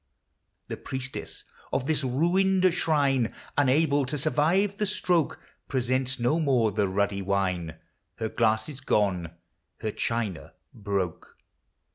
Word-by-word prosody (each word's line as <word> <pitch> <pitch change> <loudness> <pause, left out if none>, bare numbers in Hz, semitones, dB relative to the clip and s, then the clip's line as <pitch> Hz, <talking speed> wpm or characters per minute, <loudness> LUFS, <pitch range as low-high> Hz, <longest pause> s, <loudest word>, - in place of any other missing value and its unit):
The - - -5
Priestess 130 0 -6 0.3
of 130 - 0
this 150 -1 0
ruined 180 +7 +3
shrine, 140 -8 +1 0.2
Unable 145 +1 +3
to 150 +2 -2
survive 165 +8 +1
the 210 - 0
stroke, 180 -5 +1 0.3
Presents 130 0 0
no 125 +7 +2
more 130 -8 +2
the 100 0 +1
ruddy 100 +1 0
wine, 95 -4 -1 0.2
— - - -50
Her 110 -1 -3
glasses 110 +4 0
gone, 95 -9 +1 0.5
her 110 - -1
china 110 -6 -3 0.2
broke. 100 -4 -3
130 Hz, 120 wpm, -27 LUFS, 105-155 Hz, 0.5 s, ruined